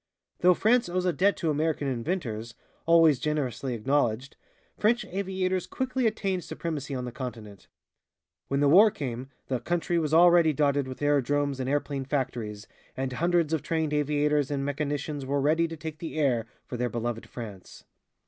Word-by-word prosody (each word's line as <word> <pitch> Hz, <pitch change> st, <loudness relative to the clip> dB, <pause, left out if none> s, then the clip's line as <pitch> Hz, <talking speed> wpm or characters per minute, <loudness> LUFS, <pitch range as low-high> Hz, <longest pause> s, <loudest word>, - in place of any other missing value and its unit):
Though 180 Hz, 0 st, +5 dB
France 235 Hz, +2 st, +3 dB
owes 180 Hz, +1 st, -1 dB
a 180 Hz, -, +2 dB
debt 200 Hz, +4 st, +2 dB
to 165 Hz, -3 st, 0 dB
American 150 Hz, -1 st, 0 dB
inventors, 120 Hz, -, -3 dB, 0.3 s
always 165 Hz, -5 st, +6 dB
generously 135 Hz, -4 st, -2 dB
acknowledged, 130 Hz, +1 st, 0 dB, 0.4 s
French 235 Hz, +3 st, +2 dB
aviators 185 Hz, -1 st, -2 dB
quickly 260 Hz, -2 st, -1 dB
attained 195 Hz, -4 st, -1 dB
supremacy 150 Hz, -4 st, -4 dB
on 125 Hz, -1 st, -3 dB
the 125 Hz, -, -5 dB
continent. 115 Hz, -6 st, -8 dB, 0.8 s
When 140 Hz, +1 st, 0 dB
the 145 Hz, -, +4 dB
war 195 Hz, +9 st, +7 dB
came, 130 Hz, -, -5 dB, 0.2 s
the 130 Hz, -2 st, -1 dB
country 170 Hz, +5 st, 0 dB
was 155 Hz, -2 st, -1 dB
already 170 Hz, -1 st, +6 dB
dotted 140 Hz, -2 st, +1 dB
with 130 Hz, +2 st, -7 dB
aerodromes 145 Hz, -1 st, +1 dB
and 130 Hz, 0 st, -2 dB
airplane 140 Hz, -1 st, -1 dB
factories, 120 Hz, -7 st, -3 dB, 0.3 s
and 130 Hz, -1 st, -2 dB
hundreds 170 Hz, +2 st, +1 dB
of 160 Hz, -, +1 dB
trained 160 Hz, -2 st, -1 dB
aviators 150 Hz, -1 st, +1 dB
and 140 Hz, -1 st, -2 dB
mechanicians 145 Hz, 0 st, -3 dB
were 140 Hz, +2 st, -1 dB
ready 160 Hz, +4 st, +2 dB
to 165 Hz, 0 st, -7 dB
take 160 Hz, 0 st, -7 dB
the 160 Hz, -2 st, -6 dB
air 125 Hz, -7 st, +1 dB, 0.2 s
for 125 Hz, -, -6 dB
their 125 Hz, 0 st, -1 dB
beloved 120 Hz, -1 st, -4 dB
France. 105 Hz, -6 st, -9 dB
145 Hz, 165 wpm, -27 LUFS, 130-170 Hz, 0.8 s, war